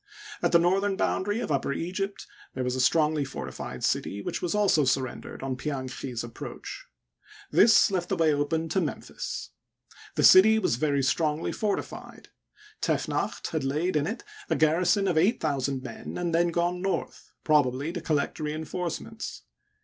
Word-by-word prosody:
At - - +2
the 170 - +7
northern 190 +4 +2
boundary 205 +3 0
of - - -3
Upper 140 -1 0
Egypt 190 +6 -3 0.3
there 130 - -2
was 125 0 -1
a 130 - 0
strongly 150 +3 +3
fortified 65 - -6
city 100 - 0
which 100 - -4
was 175 +2 -1
also 200 -7 +3
surrendered 130 0 -2
on 135 -1 -2
Pianchi's 130 -3 -4
approach. 120 -1 -8 0.6
This 220 -1 +6
left 180 -2 -1
the 195 - +1
way 160 -3 +3
open 155 +3 0
to 190 +4 +1
Memphis. 160 - -5 0.6
The - - +1
city 220 +4 +8
was 120 - +1
very 140 -1 +1
strongly 150 +4 0
fortified; 210 -2 -4 0.5
Tefnacht - - -1
had 160 -3 -2
laid 155 +7 0
in 150 0 +1
it 225 - -4 0.3
a - - +2
garrison 175 +5 +3
of 170 -4 +2
eight 200 +9 +3
thousand 140 -3 -1
men, 120 -4 -7
and 175 -1 -2
then 170 +1 +3
gone 175 +1 0
north, 195 0 -3
probably 145 0 +2
to 175 - -4
collect 150 -1 -1
re 150 -1 -2
enforcements. 175 +7 -5
160 Hz, 160 wpm, -27 LUFS, 140-180 Hz, 0.6 s, city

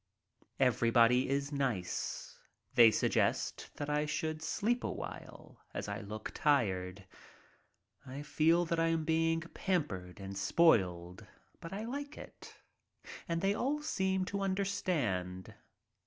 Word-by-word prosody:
Everybody 120 0 +4
is 140 +1 -1
nice. 125 -11 -3 0.3
They 120 -3 +8
suggest 110 - 0
that 145 - -4
I 150 0 0
should 155 +1 -2
sleep 235 +9 0
awhile, - - -7
as - - -3
I - - -4
look 105 +1 -6
tired. 95 -9 +1 1.0
I 135 +2 -7
feel 160 +3 +3
that 170 0 -1
I 165 - +3
am 165 -1 0
being 165 0 +2
pampered 125 - -3
and 95 0 -7
spoiled. 95 - +2 0.3
But 165 - -8
I 205 +3 -4
like 285 +4 -5
it. - - -12 0.7
And 165 0 -1
they 195 +1 +2
all 290 +7 -1
seem 190 -9 0
to 200 +1 -3
understand. 155 - -1
150 Hz, 125 wpm, -33 LUFS, 110-175 Hz, 1.0 s, They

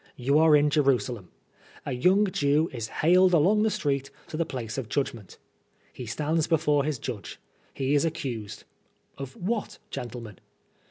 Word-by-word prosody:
You 140 +4 +2
are 160 -1 +6
in 150 0 +3
Jerusalem. 130 - +1 0.6
A - - -3
young 185 +11 +3
Jew 150 -3 +1
is 115 -3 -4
haled 180 +7 +4
along 190 +7 +4
the 220 - +3
street 140 -7 -1 0.2
to - - -6
the 165 +1 -1
place 120 -3 -4
of 120 -5 -6
judgment. 115 -5 -3 0.6
He 125 - -8
stands 155 +7 0
before 150 -3 +2
his 150 -3 -1
judge; 115 -4 -6 0.3
he 135 +1 -1
is 145 - +3
accused 135 -11 -4 0.3
— - - -41
of 135 -1 -6
what, 210 +4 -3
gentlemen? 115 -4 -7
145 Hz, 160 wpm, -27 LUFS, 125-165 Hz, 0.6 s, are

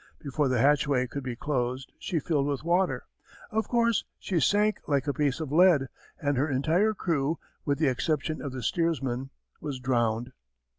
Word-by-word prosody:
Before 145 0 -1
the 130 -1 +1
hatchway 140 -1 +3
could 140 +3 -5
be 125 -2 -4
closed, 130 -1 -2
she 180 - -2
filled 145 -2 0
with 140 -1 -2
water. 175 +3 +1 0.5
Of 220 -1 0
course, 235 -2 +2
she 180 -4 -1
sank 205 +7 +3
like 140 -2 +1
a 145 - 0
piece 145 -1 0
of 155 -4 -4
lead 160 -4 +5 0.3
and 145 -4 0
her 145 +4 +1
entire 165 +11 +2
crew, 160 -4 0 0.3
with 140 -1 +1
the 155 - +1
exception 155 +3 -1
of 140 - -4
the 130 -1 -6
steersman, 135 -4 -1 0.3
was 145 -4 -4
drowned. 120 -2 0
145 Hz, 175 wpm, -28 LUFS, 130-165 Hz, 0.5 s, lead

